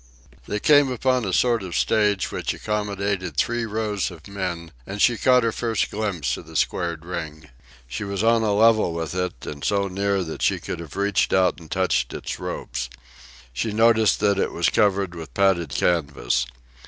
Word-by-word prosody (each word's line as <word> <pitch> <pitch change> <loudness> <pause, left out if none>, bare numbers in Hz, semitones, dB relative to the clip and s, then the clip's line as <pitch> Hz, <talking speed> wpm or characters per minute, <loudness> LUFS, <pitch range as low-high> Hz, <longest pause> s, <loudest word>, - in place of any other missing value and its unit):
They 105 - -2
came 145 +1 +5
upon 125 -1 +1
a 95 - -2
sort 120 +4 +2
of 90 -3 -6
stage, 105 -3 +2
which - - -2
accommodated 100 -5 -2
three 120 +7 0
rows 105 -2 -1
of 85 -4 -12
men; 90 -4 -4 0.2
and 100 +1 -6
she 120 +3 +4
caught 125 +1 +4
her 115 - +1
first 115 -2 -1
glimpse 95 - -2
of - - -11
the - - -12
squared 85 -2 -1
ring. 80 -4 -6 0.4
She 65 - -5
was 100 0 -3
on 115 0 +4
a 110 -2 +1
level 110 -4 +4
with 80 -2 -3
it, 90 0 -3
and 70 -1 -7
so 100 -1 +1
near 100 0 0
that 80 -2 -7
she - - +2
could - - -5
have 85 -4 -9
reached 100 -1 +1
out 95 -1 +3
and 80 -2 -14
touched 90 -9 0
its - - -5
ropes. - - -4 0.6
She 105 - -2
noticed 110 0 +4
that 100 -2 +2
it - - 0
was - - +2
covered 100 -3 +2
with 80 -6 -9
padded 95 -5 +2
canvas. 70 -7 0
100 Hz, 185 wpm, -23 LUFS, 85-110 Hz, 0.6 s, came